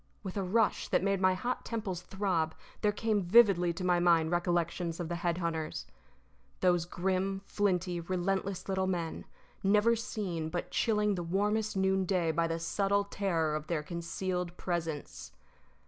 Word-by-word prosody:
With 190 -2 -5
a 200 - 0
rush 210 +4 +1
that - - +1
made 195 -1 +1
my 185 0 +4
hot 245 +6 -2
temples 205 -6 -3
throb 180 -4 -1 0.3
there 210 - +3
came 210 0 0
vividly 185 -2 +5
to 180 +2 -5
my 180 -1 +3
mind 170 -2 +4
recollections 175 -1 0
of 170 -2 -3
the 175 - -2
head 170 -1 0
hunters 165 -3 -3 0.7
_those 175 -2 +2
grim, 190 +2 -1
flinty, 180 -4 0
relentless 185 +2 -2
little 190 -1 0
men, 170 -3 -3 0.4
never 210 +4 +4
seen, 185 -8 -3
but 175 +2 -4
chilling 210 -2 +2
the 180 - -2
warmest 205 +4 0
noonday 190 -3 +2
by 165 +1 +1
the 165 0 -1
subtle 200 +4 +1
terror 180 -6 -1
of 155 0 -4
their 160 -3 -1
concealed 180 +1 -3
presence 165 -4 -4
185 Hz, 155 wpm, -31 LUFS, 170-195 Hz, 0.7 s, vividly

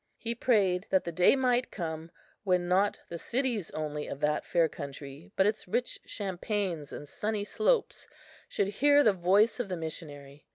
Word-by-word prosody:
He 230 0 -3
prayed 200 -7 +2
that 190 - +3
the 170 - -4
day 180 +9 +5
might 250 -2 +1
come, 160 -2 -5 0.3
when 180 -3 +1
not 195 +3 +2
the 170 - -5
cities 240 -6 -1
only 150 -1 -4
of 140 - -6
that 150 0 +1
fair 170 -2 +2
country, 140 +3 -9
but 190 - +3
its 210 -1 -1
rich 245 +7 -1
champaigns 190 -5 -3
and 145 - -8
sunny 210 +6 -2
slopes 445 - 0 0.4
should 200 - 0
hear 285 +7 +4
the 215 - +5
voice 195 +7 +3
of 235 -5 -2
the 180 - -2
missionary. 145 -3 -8
185 Hz, 170 wpm, -30 LUFS, 160-220 Hz, 0.4 s, day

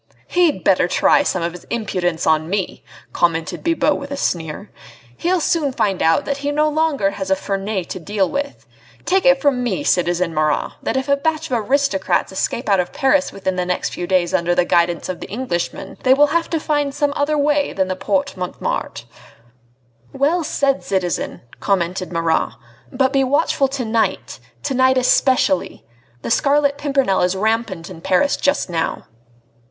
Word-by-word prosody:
"He'd 340 - +2
better 185 -2 +3
try - - +3
some 180 - -1
of 170 - -1
his 180 0 -12
impudence 180 -7 -2
on 160 0 +2
me!" 195 -1 -3 0.3
commented 165 -2 0
Bibot 310 -3 +2
with 280 - -7
a 280 - -4
sneer, 165 - -3 0.4
"he'll 360 +2 0
soon 310 -3 +1
find 200 -7 -1
out 165 - +3
that 280 - -2
he 285 +1 -3
no 300 +1 +2
longer 300 -10 +1
has 190 -1 -5
a 190 - +4
Ferney 195 0 -3
to 185 - -6
deal 195 +2 0
with. 285 +4 -4 0.4
Take 380 -5 +2
it 270 0 +5
from 270 -3 +1
me, 245 +4 -1
citizen 175 - +1
Marat, 155 -1 0
that - - -1
if 265 - -2
a 280 - +4
batch 315 +1 -2
of 240 - +2
aristocrats 275 -12 +1
escape 230 +5 -2
out 200 -2 +3
of 180 - -1
Paris 275 +1 +2
within 190 -1 -3
the 180 - +1
next 180 - -1
few 175 - -4
days, 180 -2 +1
under 175 +1 +1
the 175 - +3
guidance 170 -1 +1
of 185 - -4
the - - -7
d - - -7
d - - -5
Englishman, 175 -10 -4
they 260 0 +5
will 290 +1 +4
have 335 0 +1
to 325 - -1
find 290 -2 -1
some 290 -1 0
other 300 +1 0
way 290 0 +1
than 190 -1 0
the 185 - -2
Porte 280 +9 -1
Montmartre." 180 -1 -4 1.1
"Well 320 +6 +1
said, 275 -2 0
citizen!" 185 -3 -2 0.2
commented 185 -2 -1
Marat. 165 -1 0 0.4
"But 265 +1 +1
be 270 -1 +3
watchful 275 0 +2
to 265 -2 -4
night... 220 0 -1 0.2
to 285 - -1
night 260 0 +3
especially. 255 -6 +2 0.4
The - - -3
Scarlet 285 +2 +2
Pimpernel 275 -9 +1
is 180 +1 +1
rampant 215 -4 -1
in 165 -3 -10
Paris 190 +10 +2
just 285 +1 0
now." 165 -3 -2
230 Hz, 185 wpm, -19 LUFS, 180-285 Hz, 1.1 s, it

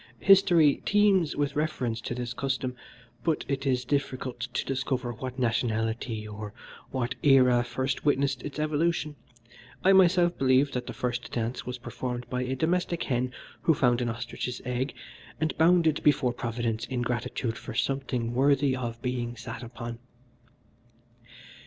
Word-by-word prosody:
History 175 -7 +6
teems 200 -6 +3
with 145 -1 -1
reference 130 -7 -1
to 120 - -4
this 120 -1 -4
custom, 130 0 -2 0.5
but 160 -3 0
it 140 0 -2
is 125 -2 +1
difficult 130 -2 -2
to - - -2
discover 130 -2 -1
what 130 +2 -6
nationality 115 -2 -1
or 105 0 -7 0.4
what 130 -1 -2
era 125 -4 +5
first 130 +3 -2
witnessed 140 -2 +1
its 145 0 -7
evolution. 155 0 0 0.7
I 195 - +6
myself 180 -2 +5
believe 135 +1 +4
that 125 -1 -4
the - - -5
first 125 0 -3
dance 120 +1 -3
was 125 0 -3
performed 125 -1 -5
by 125 0 -1
a 130 +1 -2
domestic 170 +3 0
hen 125 -1 -1 0.3
who 160 - +3
found 125 -2 +2
an 120 - 0
ostrich's 120 +1 -4
egg, 125 +2 -2 0.4
and 155 -3 0
bounded 165 -2 +4
before 135 -4 +3
Providence 115 -1 -2
in 125 -2 -2
gratitude 120 -1 -2
for 115 - -8
something 125 -3 -1
worthy 135 +1 +3
of 120 -2 -4
being 120 -1 -2
sat 115 +1 -7
upon. 120 -1 -7
130 Hz, 145 wpm, -28 LUFS, 120-145 Hz, 0.7 s, History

